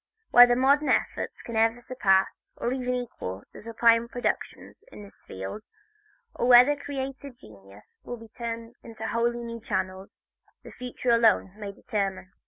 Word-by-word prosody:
Whether 245 0 +8
modern 280 +4 +3
efforts - - -1
can 235 - -7
ever 225 +2 +2
surpass, 195 -6 +1
or 240 - -2
even 250 -1 -2
equal, 100 - -6
the - - -11
sublime 230 +1 +3
productions 245 +1 -4
in 210 - -11
this 200 - -16
field, 95 - -7 0.7
or 240 - -1
whether 250 +4 +7
creative 275 -2 -6
genius 100 - -17
will 245 - -6
be 225 0 -13
turned 230 0 -6
into 230 -1 -7
wholly 235 +1 -1
new 230 -1 -7
channels, 190 -3 -4 0.5
the - - -11
future 250 0 -3
alone 225 -4 +3
may 205 -2 -7
determine. 195 -2 -4
230 Hz, 150 wpm, -26 LUFS, 205-245 Hz, 0.7 s, Whether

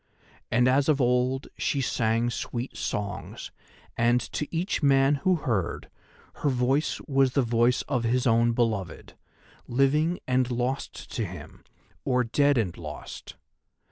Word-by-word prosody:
And 120 +2 +3
as 135 +3 +3
of 150 -2 +3
old 125 +1 +1
she 140 - 0
sang 120 -2 0
sweet 120 +2 -4
songs, 100 -1 -4 0.4
and, 120 +1 +3
to 150 - -2
each 175 +3 -2
man 140 0 +4
who 185 +3 +3
heard, 115 - -2 0.5
her 145 - 0
voice 130 +3 +1
was 135 -3 +2
the 140 - +3
voice 120 +1 +2
of 125 -4 -1
his 120 +2 +1
own 115 0 +3
beloved, 110 -7 -2 0.5
living 150 +7 +2
and 130 -1 +2
lost 125 +2 -3
to 115 - -2
him, 90 -6 -9 0.4
or 125 -1 +2
dead 140 +4 +2
and 100 -7 0
lost. - - -8
125 Hz, 140 wpm, -27 LUFS, 115-135 Hz, 0.5 s, man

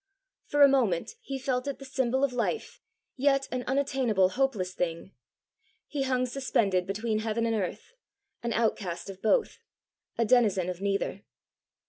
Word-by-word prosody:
For 290 0 +4
a - - +10
moment 235 -11 +1
he 275 - -4
felt 255 0 -1
it 280 - -3
the 275 - -10
symbol 265 0 0
of 275 -2 +2
life, 245 - -2 0.4
yet 275 0 +2
an 255 0 -2
unattainable 255 -8 +2
hopeless 210 -6 0
thing. 175 +1 -3 0.7
He 290 - -4
hung 255 -1 +1
suspended 215 -8 0
between 215 +2 -1
heaven 225 +1 -1
and 230 - +1
earth, 210 - -4 0.5
an 235 - -2
outcast 200 -6 -1
of 190 - -14
both, 440 - +1 0.6
a 230 - +2
denizen 210 -6 +3
of 180 +1 -9
neither! 200 0 -1
235 Hz, 150 wpm, -28 LUFS, 195-270 Hz, 0.7 s, a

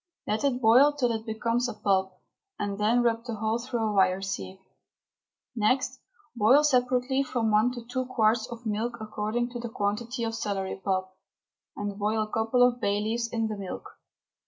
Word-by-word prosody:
Let 215 +4 -1
it 270 -3 +1
boil 255 +5 +6
till 255 -5 +1
it 220 0 -4
becomes 230 +3 0
a - - -6
pulp, 190 -3 0 0.4
and 200 0 -3
then 230 +4 +3
rub 230 -1 +1
the 235 -2 -4
whole 220 +2 -1
through 240 -1 -3
a 210 - -1
wire 190 -1 +3
sieve. 190 0 -5 1.0
Next 235 +4 +1 0.4
boil 240 +7 +5
separately 255 -1 +2
from 240 -5 -1
one 215 +4 +4
to 240 -2 -8
two 255 +1 -3
quarts 225 -2 +2
of 235 0 -9
milk 225 +3 -2
according 220 +3 -2
to 240 - -5
the 235 0 -5
quantity 225 +3 -2
of 225 0 -2
celery 195 -3 -3
pulp, 185 -1 -1 0.6
and 205 0 -4
boil 215 +1 +1
a 215 - -9
couple 230 +3 +3
of 245 0 -3
bay 200 0 +1
leaves 230 +2 -1
in 225 -1 0
the 215 - -4
milk. 195 -2 -7
225 Hz, 180 wpm, -27 LUFS, 210-245 Hz, 1.0 s, boil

